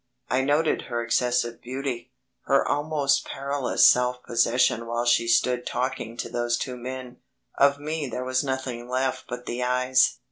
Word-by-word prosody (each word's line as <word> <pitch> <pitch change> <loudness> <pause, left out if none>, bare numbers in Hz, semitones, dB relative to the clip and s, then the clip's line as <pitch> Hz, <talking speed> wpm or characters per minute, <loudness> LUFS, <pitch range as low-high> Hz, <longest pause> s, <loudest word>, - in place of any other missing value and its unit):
I 130 - +3
noted 145 +4 +1
her 120 -1 -2
excessive 120 0 0
beauty; 125 -1 -5 0.4
her 135 0 +3
almost 145 -2 +1
perilous 140 -1 +1
self 125 0 +4
possession 115 0 +2
while 120 +1 -1
she 120 -1 +3
stood 125 +1 +2
talking 125 -2 -3
to - - -3
those 120 0 0
two 125 - -4
men. 125 0 -7 0.4
Of 140 0 +5
me 150 0 -3
there 125 +1 -4
was 130 +1 0
nothing 130 -3 -4
left 130 +1 -1
but 125 0 -6
the 120 +1 -4
eyes. 125 +1 +2
125 Hz, 155 wpm, -25 LUFS, 120-135 Hz, 0.4 s, Of